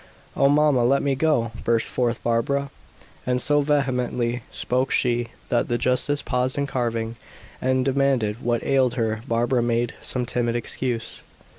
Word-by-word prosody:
"Oh, 140 - +4
mamma, 145 -3 +4
let 135 +3 +3
me 140 -1 +1
go!" 135 -5 +1
burst 115 -1 +1
forth 120 -2 -1
Barbara, 135 +4 0 0.5
and 125 0 0
so 145 +2 +3
vehemently 125 -4 0
spoke 130 +2 0
she, 120 -1 +1 0.2
that 120 - +1
the 120 - 0
justice 130 +4 +1
paused 125 +1 -1
in 140 - +1
carving, 115 -3 -2 0.4
and 130 0 +1
demanded 130 -5 +1
what 120 -1 0
ailed 130 -3 +2
her. 110 -3 -1
Barbara 120 +1 +1
made 120 0 0
some 125 -1 -2
timid 120 0 -1
excuse. 120 0 -2
125 Hz, 150 wpm, -23 LUFS, 120-135 Hz, 0.5 s, Oh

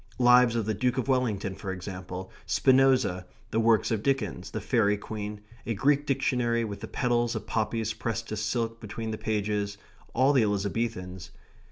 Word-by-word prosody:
Lives 125 -1 +6
of 115 -3 0
the 110 - 0
Duke 125 +4 0
of 130 - -1
Wellington, 110 -7 0
for 95 0 -5
example; 90 0 -6 0.2
Spinoza; 130 -9 +3 0.2
the 110 - +1
works 115 0 +3
of 110 -2 0
Dickens; 105 - -1
the - - -4
Faery 105 -5 +2
Queen; 105 0 -6 0.3
a 115 - -1
Greek 145 +6 +2
dictionary 125 -3 +1
with 105 -3 -5
the - - -6
petals 120 -1 0
of 110 -2 -4
poppies 110 0 -1
pressed 115 0 -3
to 110 - -3
silk 115 +2 -2
between 110 +1 -5
the 110 - -5
pages; 105 -1 -1 0.4
all 130 +3 +4
the 130 - +5
Elizabethans. 100 -3 -2
110 Hz, 170 wpm, -28 LUFS, 100-120 Hz, 0.4 s, Lives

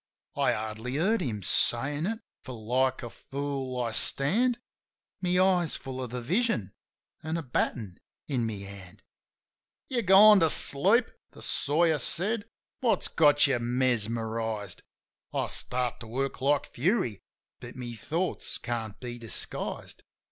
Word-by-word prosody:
" - - -50
I - - +2
hardly 110 +4 -5
heard 205 +9 +1
him 105 -7 -3
saying 145 - +1
it, 225 +1 -3 0.2
for 130 - -9
like 125 +4 0
a 120 - -5
fool 135 -2 -5
I 115 - -2
stand, 215 - +3 0.6
My 180 -1 +1
eyes 180 -3 +2
full 130 -1 -6
of 125 - -6
the 125 0 -5
vision 175 - 0 0.5
an' 160 +2 -3
a 165 - -4
batten 115 -6 -2 0.3
in 125 -6 -1
my 110 - -3
hand. 100 -1 -10 0.9
"You 250 -2 0
gone 205 +1 +8
to 165 -2 +3
sleep?" 195 - +3 0.2
the - - -9
sawyer 155 +1 +2
said. 205 - +2 0.3
"What's 240 -3 +2
got 145 -2 +4
you 135 -4 +1
mesmerized 115 -4 -1 0.3
?" - - -47
I - - +1
start 125 -1 -1
to 115 - -10
work 135 +3 -3
like 140 +2 +2
fury, 140 - 0 0.4
but - - -10
my 125 -2 -6
thoughts 165 - -3
can't 115 -3 -5
be 120 -1 -7
disguised. 115 -6 -2
130 Hz, 145 wpm, -28 LUFS, 115-170 Hz, 0.9 s, gone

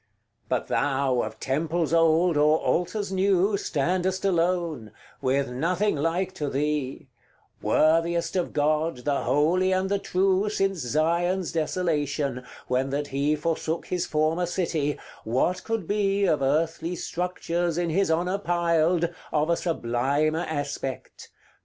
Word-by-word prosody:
But - - 0
thou, 135 -3 +1
of - - -6
temples 160 +4 -1
old, 165 +1 +4
or 150 +1 +4
altars 195 +5 -1
new, 195 +1 +2
Standest 185 +2 -1
alone 170 - 0 0.3
with 135 +1 +1
nothing 180 +10 0
like 170 +5 -1
to 150 -5 -3
thee 140 -1 -2 0.5
Worthiest 165 +2 +2
of 180 -2 0
God, 150 -2 0
the 145 -1 0
holy 175 +6 +2
and 185 +1 +1
the 200 0 +1
true, 195 +1 +1
Since 195 -3 0
Zion's 170 +7 0
desolation, 150 -5 -1 0.2
when 130 +2 0
that 145 +1 -2
he 140 +3 +1
Forsook 160 +1 -2
his 180 -1 -2
former 160 +3 +1
city, 165 -5 -1 0.3
what 130 +11 0
could 225 -6 -3
be, 200 -1 +1
Of 155 -6 +2
earthly 165 +5 0
structures, 175 -1 -2
in 175 -2 0
his 195 +3 +1
honour 180 +4 0
piled, 170 -1 +2 0.2
Of 155 +2 +1
a - - +4
sublimer 150 +1 0
aspect? 140 -3 -5
165 Hz, 130 wpm, -26 LUFS, 145-180 Hz, 0.5 s, old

